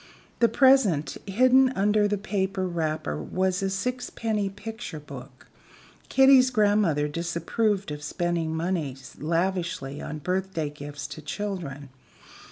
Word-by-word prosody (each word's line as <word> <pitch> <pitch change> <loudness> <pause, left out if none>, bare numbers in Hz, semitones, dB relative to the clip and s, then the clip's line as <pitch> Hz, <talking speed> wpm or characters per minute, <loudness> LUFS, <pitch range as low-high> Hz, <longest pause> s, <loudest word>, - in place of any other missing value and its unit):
The 235 - +5
present 260 - +4
hidden 255 +6 +5
under 205 +1 +3
the 205 0 0
paper 195 -2 -1
wrapper 155 - -2
was 185 - -1
a 195 - 0
sixpenny 220 -1 -2
picture 210 -4 -7
book. 135 -3 -11 0.6
Kitty's 265 -1 +6
grandmother 205 - +2
disapproved 170 +5 -1
of 150 0 -6
spending 165 +1 -2
money 160 -5 -2 0.2
lavishly 170 -4 -1
on 150 - -5
birthday 180 -2 -2
gifts 145 0 -8
to 145 +2 -8
children. 155 -6 -5
185 Hz, 115 wpm, -26 LUFS, 150-210 Hz, 0.6 s, Kitty's